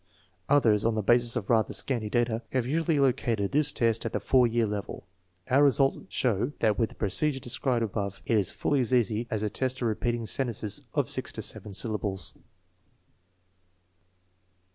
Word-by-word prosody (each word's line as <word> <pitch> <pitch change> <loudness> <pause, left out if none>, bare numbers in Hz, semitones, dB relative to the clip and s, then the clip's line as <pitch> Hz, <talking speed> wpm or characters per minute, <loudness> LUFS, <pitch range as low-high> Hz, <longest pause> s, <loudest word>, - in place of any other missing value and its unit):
Others, 115 -8 +4
on 115 -1 +1
the 110 - -1
basis 120 +2 +3
of 110 -5 -3
rather 110 -2 +2
scanty 115 -6 -1
data, 120 0 0
have 130 -2 +1
usually 160 +2 +1
located 120 -6 +1
this 145 0 +2
test 115 -1 +1
at 115 - -4
the - - 0
4 125 -2 +3
year 115 0 +1
level. 105 -1 -5 0.4
Our 140 +3 +4
re - - +7
sults 135 0 +1
show 120 +3 0
that 110 -3 +1
with 115 - +1
the - - -15
procedure 135 +8 0
described 125 -1 0
above 100 -2 -4
it 115 - +1
is 100 -4 +2
fully 145 - 0
as 125 0 +1
easy 115 0 +1
as 110 - -2
the 105 - 0
test 130 -1 -2
of 120 - 0
repeating 115 +1 -1
sentences 110 -4 -2
of - - +1
6 - - -3
to - - -5
7 100 -1 -4
syllables. 100 -4 -1
115 Hz, 180 wpm, -28 LUFS, 105-130 Hz, 0.4 s, re